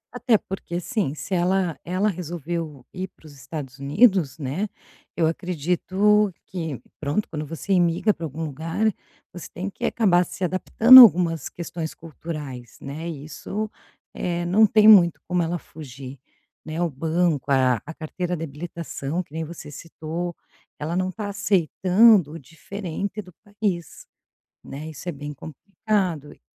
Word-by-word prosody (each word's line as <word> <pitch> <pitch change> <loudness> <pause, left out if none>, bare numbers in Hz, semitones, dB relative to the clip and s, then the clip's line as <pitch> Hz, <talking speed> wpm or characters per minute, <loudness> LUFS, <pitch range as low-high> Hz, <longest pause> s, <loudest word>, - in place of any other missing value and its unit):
até 245 -2 +3
porque 185 -3 -5
sim, 195 - -2
se 170 +5 -6
ela 180 -2 +1
ela 185 +4 0
resolveu 165 -5 -5
ir 185 0 -5
para - - -25
os 150 - -12
Estados 135 -1 -8
Unidos, 155 - +3
né, 155 +10 -3 0.5
eu 165 -2 +2
acredito 185 +5 +1
que, 160 -7 -5 0.2
pronto, 150 +8 -1
quando 155 -3 -5
você 165 +6 -3
imigra 175 +3 +3
pra 165 - -6
algum 160 +2 -5
lugar, 165 +9 -1 0.4
você 175 - -9
tem 185 +3 -4
que - - -12
acabar 185 -6 +3
se - - -11
adaptando 225 +8 +8
a - - +15
algumas 170 - +3
questões 170 -2 -6
culturais, 150 -7 -8
né, 155 +5 -6
isso, 165 +8 -5 0.4
eh, 175 -1 -2
não 200 +6 +5
tem 215 +1 +5
muito 180 -6 +7
como 180 0 +1
ela 170 +1 -2
fugir, 135 -4 -10 0.5
né, 160 +2 -4
o 175 - +1
banco, 160 0 0
a 130 -4 +3
a 165 - -7
carteira 175 +3 -4
de 160 - -5
habilitação, 165 +1 -5
que 165 - -15
nem 160 0 -3
você 160 -1 -9
citou, 165 +3 -6 0.5
ela 155 +3 -3
não 185 0 0
tá 210 +2 -5
aceitando 195 -1 +4
o 165 - -8
diferente 195 +7 -6
do 180 -3 -16
país, 200 -5 -4 0.6
né, 150 +3 -8
isso 155 +4 -7
é - - -1
bem 145 -1 -7
complicado 175 +1 -3
e - - -25
170 Hz, 155 wpm, -24 LUFS, 155-190 Hz, 0.6 s, a